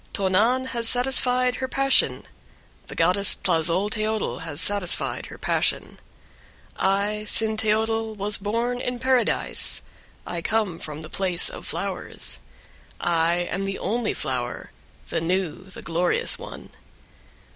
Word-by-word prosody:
2. 200 Hz, -, -1 dB
Tonan 225 Hz, +8 st, +3 dB
has 235 Hz, -2 st, +3 dB
satisfied 250 Hz, 0 st, +3 dB
her 260 Hz, -, -2 dB
passion, 275 Hz, 0 st, +2 dB, 0.6 s
the -, -, -8 dB
goddess 185 Hz, +4 st, +4 dB
Tlazolteotl 205 Hz, +7 st, 0 dB
has 160 Hz, -3 st, -4 dB
satisfied 200 Hz, -2 st, +1 dB
her -, -, -10 dB
passion. -, -, 0 dB, 0.7 s
3. -, -, -30 dB
I, 200 Hz, +2 st, +1 dB
Cinteotl, 220 Hz, 0 st, +1 dB
was 205 Hz, +1 st, +1 dB
born 230 Hz, +5 st, -1 dB
in 250 Hz, 0 st, -2 dB
Paradise, 255 Hz, -1 st, +1 dB, 0.4 s
I 170 Hz, -, -3 dB
come 205 Hz, -3 st, 0 dB
from 150 Hz, 0 st, -6 dB
the 155 Hz, -, -5 dB
place 185 Hz, -3 st, 0 dB
of -, -, -9 dB
flowers. 60 Hz, -, -2 dB, 0.6 s
I 170 Hz, +1 st, +1 dB
am 195 Hz, +2 st, -2 dB
the 195 Hz, 0 st, -3 dB
only 230 Hz, 0 st, -1 dB
flower, 125 Hz, -2 st, -3 dB, 0.4 s
the -, -, -1 dB
new, 180 Hz, +1 st, -1 dB
the 190 Hz, -, -11 dB
glorious 180 Hz, -, +2 dB
one. -, -, -10 dB
205 Hz, 125 wpm, -24 LUFS, 175-230 Hz, 0.7 s, goddess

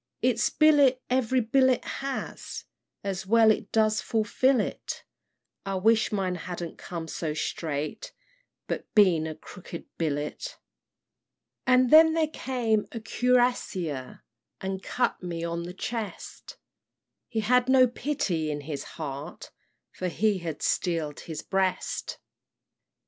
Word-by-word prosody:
"Its -, -, +3 dB
billet 290 Hz, -4 st, +5 dB
every 255 Hz, 0 st, +2 dB
bullet 260 Hz, +2 st, +3 dB
has, 275 Hz, -1 st, -5 dB, 0.4 s
And 195 Hz, -2 st, -3 dB
well 225 Hz, +1 st, +6 dB
it 210 Hz, -1 st, -2 dB
does 215 Hz, -1 st, +3 dB
fulfil 235 Hz, +4 st, +2 dB
it; -, -, -4 dB, 0.6 s
I 195 Hz, 0 st, -3 dB
wish 220 Hz, +3 st, +3 dB
mine 190 Hz, -3 st, 0 dB
hadn't 175 Hz, -1 st, -6 dB
come 170 Hz, -2 st, -6 dB
so 155 Hz, -2 st, -3 dB
straight. 155 Hz, -, -3 dB, 0.5 s
But -, -, -5 dB
been 180 Hz, -7 st, +5 dB
a 155 Hz, -, -5 dB
'crooked 175 Hz, 0 st, -10 dB
billet.' 150 Hz, -, -3 dB, 1.1 s
"And 255 Hz, -1 st, +5 dB
then 320 Hz, +1 st, +8 dB
there 320 Hz, -1 st, +2 dB
came 240 Hz, -8 st, 0 dB
a 230 Hz, -, -5 dB
cuirassier 225 Hz, -, 0 dB, 0.4 s
And 190 Hz, 0 st, -4 dB
cut 245 Hz, +4 st, -1 dB
me 170 Hz, -2 st, -4 dB
on 170 Hz, 0 st, -3 dB
the 175 Hz, -, -6 dB
chest; 220 Hz, +3 st, -6 dB, 0.7 s
He 225 Hz, -2 st, -1 dB
had 250 Hz, +3 st, +3 dB
no 260 Hz, -1 st, +7 dB
pity 220 Hz, -, -1 dB
in 145 Hz, -1 st, -3 dB
his 145 Hz, -1 st, -5 dB
heart, 150 Hz, +1 st, -6 dB, 0.4 s
For 185 Hz, -, -4 dB
he 205 Hz, +2 st, +1 dB
had 165 Hz, -4 st, -5 dB
steel'd 165 Hz, -4 st, 0 dB
his 160 Hz, -2 st, -6 dB
breast. 190 Hz, -1 st, -1 dB
205 Hz, 125 wpm, -27 LUFS, 170-250 Hz, 1.1 s, then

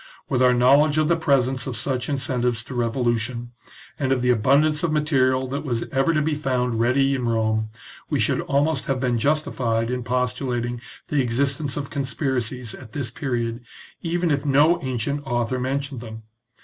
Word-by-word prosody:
With 130 Hz, -2 st, +1 dB
our 125 Hz, 0 st, +6 dB
knowledge 140 Hz, +5 st, +4 dB
of 155 Hz, -1 st, +3 dB
the 170 Hz, -, +4 dB
presence 135 Hz, -5 st, +1 dB
of 125 Hz, -4 st, -3 dB
such 130 Hz, +3 st, -1 dB
incentives 125 Hz, -5 st, -1 dB
to 130 Hz, -, -9 dB
revolution^ 120 Hz, 0 st, -1 dB, 0.5 s
and 135 Hz, -2 st, 0 dB
of 130 Hz, -2 st, +1 dB
the 125 Hz, -, +4 dB
abundance 140 Hz, +7 st, +3 dB
of 170 Hz, -, 0 dB
material 130 Hz, -4 st, +2 dB
that 140 Hz, +3 st, -3 dB
was 120 Hz, -5 st, -1 dB
ever 135 Hz, +4 st, +2 dB
to 155 Hz, -2 st, +1 dB
be 155 Hz, +1 st, 0 dB
found 125 Hz, -5 st, -1 dB
ready 135 Hz, +4 st, +3 dB
in 125 Hz, -3 st, -1 dB
Rome, 110 Hz, -1 st, 0 dB, 0.4 s
we -, -, 0 dB
should -, -, +1 dB
almost 145 Hz, +3 st, 0 dB
have 135 Hz, -2 st, 0 dB
been 125 Hz, -2 st, 0 dB
justified 120 Hz, -5 st, 0 dB
in 125 Hz, 0 st, -2 dB
postulating 125 Hz, -1 st, -1 dB, 0.3 s
the 145 Hz, -2 st, +2 dB
existence 140 Hz, +4 st, -1 dB
of 140 Hz, -1 st, -4 dB
conspiracies 125 Hz, -3 st, -2 dB
at 115 Hz, -4 st, -12 dB
this 130 Hz, -6 st, -3 dB
period, 120 Hz, -2 st, -3 dB, 0.4 s
even 170 Hz, 0 st, 0 dB
if 140 Hz, -1 st, 0 dB
no 150 Hz, +5 st, +4 dB
ancient 130 Hz, +2 st, -2 dB
author 120 Hz, -1 st, -1 dB
mentioned 135 Hz, 0 st, -3 dB
them. 110 Hz, -1 st, -9 dB
130 Hz, 175 wpm, -23 LUFS, 120-140 Hz, 0.5 s, our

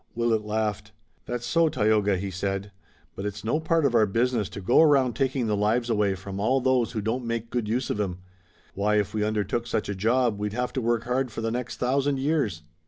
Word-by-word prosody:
Willet 115 Hz, -2 st, +1 dB
laughed. 105 Hz, 0 st, -2 dB, 0.3 s
"That's 120 Hz, 0 st, -3 dB
so, 165 Hz, +1 st, +3 dB
Tayoga," 105 Hz, -6 st, +2 dB
he 95 Hz, +1 st, -4 dB
said, 100 Hz, +2 st, -3 dB, 0.4 s
"but 95 Hz, -, -5 dB
it's 105 Hz, 0 st, -5 dB
no 115 Hz, +8 st, 0 dB
part 160 Hz, -1 st, +1 dB
of 135 Hz, -, +2 dB
our 110 Hz, -3 st, +4 dB
business 115 Hz, 0 st, 0 dB
to -, -, -7 dB
go 105 Hz, +10 st, +4 dB
around 140 Hz, -6 st, +4 dB
taking 130 Hz, +1 st, 0 dB
the 105 Hz, -1 st, +1 dB
lives 115 Hz, +4 st, +1 dB
away 105 Hz, -3 st, +2 dB
from 95 Hz, +1 st, -7 dB
all 130 Hz, +6 st, +2 dB
those 130 Hz, -2 st, +1 dB
who 110 Hz, -, -2 dB
don't 115 Hz, +4 st, -2 dB
make 115 Hz, -1 st, -3 dB
good 120 Hz, -3 st, -1 dB
use 125 Hz, +4 st, -1 dB
of 105 Hz, -, -1 dB
'em. 90 Hz, -3 st, -2 dB, 0.6 s
Why, 105 Hz, +2 st, +1 dB
if 105 Hz, -2 st, 0 dB
we 105 Hz, -1 st, 0 dB
undertook 110 Hz, +2 st, -1 dB
such -, -, -2 dB
a -, -, -1 dB
job 115 Hz, +2 st, +1 dB
we'd 105 Hz, 0 st, -2 dB
have 125 Hz, +2 st, -2 dB
to 130 Hz, -, -1 dB
work 120 Hz, 0 st, 0 dB
hard 125 Hz, +1 st, -1 dB
for 115 Hz, -, -5 dB
the 115 Hz, 0 st, -1 dB
next 125 Hz, +1 st, -4 dB
thousand 135 Hz, +2 st, +1 dB
years. 135 Hz, -, 0 dB
115 Hz, 225 wpm, -26 LUFS, 105-125 Hz, 0.6 s, our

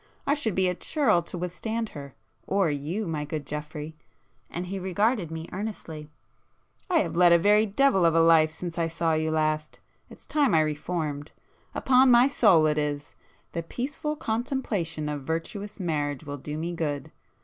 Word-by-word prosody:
I 280 Hz, -, +3 dB
should 235 Hz, -9 st, -1 dB
be 190 Hz, -1 st, +2 dB
a 180 Hz, -, +1 dB
churl 215 Hz, -, +2 dB
to 170 Hz, -, -8 dB
withstand 210 Hz, +6 st, -3 dB
her,—or 140 Hz, -, -3 dB
you, 155 Hz, +9 st, -3 dB
my 155 Hz, -4 st, -2 dB
good 150 Hz, 0 st, -5 dB
Geoffrey,"—and 150 Hz, -1 st, -8 dB
he 190 Hz, +2 st, -4 dB
regarded 190 Hz, +1 st, 0 dB
me 160 Hz, 0 st, -6 dB
earnestly—"I 185 Hz, -, -7 dB
have -, -, -3 dB
led 175 Hz, 0 st, +6 dB
a 170 Hz, -, +8 dB
very 210 Hz, +5 st, +4 dB
devil 210 Hz, -2 st, +3 dB
of 165 Hz, -1 st, +4 dB
a -, -, +5 dB
life 165 Hz, -1 st, +6 dB
since 170 Hz, +2 st, -6 dB
I 165 Hz, -, +1 dB
saw 165 Hz, 0 st, 0 dB
you 160 Hz, 0 st, 0 dB
last,—it's 155 Hz, -1 st, -3 dB
time 290 Hz, -, +2 dB
I 160 Hz, -, +5 dB
reformed,—upon 155 Hz, -, 0 dB
my 245 Hz, +1 st, +7 dB
soul 195 Hz, -, +5 dB
it 150 Hz, 0 st, +2 dB
is! 145 Hz, -1 st, -3 dB, 0.4 s
The 170 Hz, -, -3 dB
peaceful 275 Hz, -, -4 dB
contemplation 220 Hz, -, -2 dB
of 150 Hz, -1 st, -3 dB
virtuous 180 Hz, +8 st, -4 dB
marriage 145 Hz, -5 st, -2 dB
will 145 Hz, -1 st, -6 dB
do 150 Hz, +3 st, -6 dB
me 165 Hz, +2 st, -3 dB
good! 145 Hz, -5 st, -3 dB
165 Hz, 160 wpm, -27 LUFS, 155-205 Hz, 0.4 s, a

